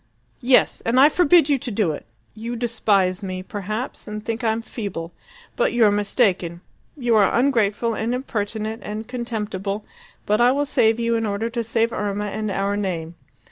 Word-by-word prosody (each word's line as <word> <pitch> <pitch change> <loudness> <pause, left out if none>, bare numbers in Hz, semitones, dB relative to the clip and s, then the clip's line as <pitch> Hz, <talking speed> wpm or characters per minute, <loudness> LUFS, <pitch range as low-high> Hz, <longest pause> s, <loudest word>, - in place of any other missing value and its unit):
"Yes! 250 0 +3
and 235 +3 +2
I 285 +3 +8
forbid 345 -1 +5
you 285 -3 +2
to 245 - -4
do 205 -6 +1
it! 150 - -7 0.3
You 230 +2 -5
despise 210 -6 +1
me, 185 -2 -5
perhaps, 215 +6 -5
and 215 0 -6
think 230 +2 -3
I'm 225 0 0
feeble. 195 -8 -5 0.4
But - - +1
you're 225 -4 +5
mistaken. 195 -5 0 0.4
You 240 -4 +1
are 200 -3 +4
ungrateful 230 -3 +2
and 220 +2 -2
impertinent 220 -2 -3
and 215 +1 -5
contemptible, 215 -5 -4 0.4
but 210 +3 +2
I 245 +1 +5
will 290 +1 0
save 230 -5 +2
you 235 0 +1
in 225 -1 0
order 210 +3 -2
to 235 -1 -2
save 230 +1 0
Irma 205 0 -2
and 215 +1 -3
our 200 +1 -1
name. 175 -5 -3
220 Hz, 175 wpm, -22 LUFS, 205-235 Hz, 0.4 s, I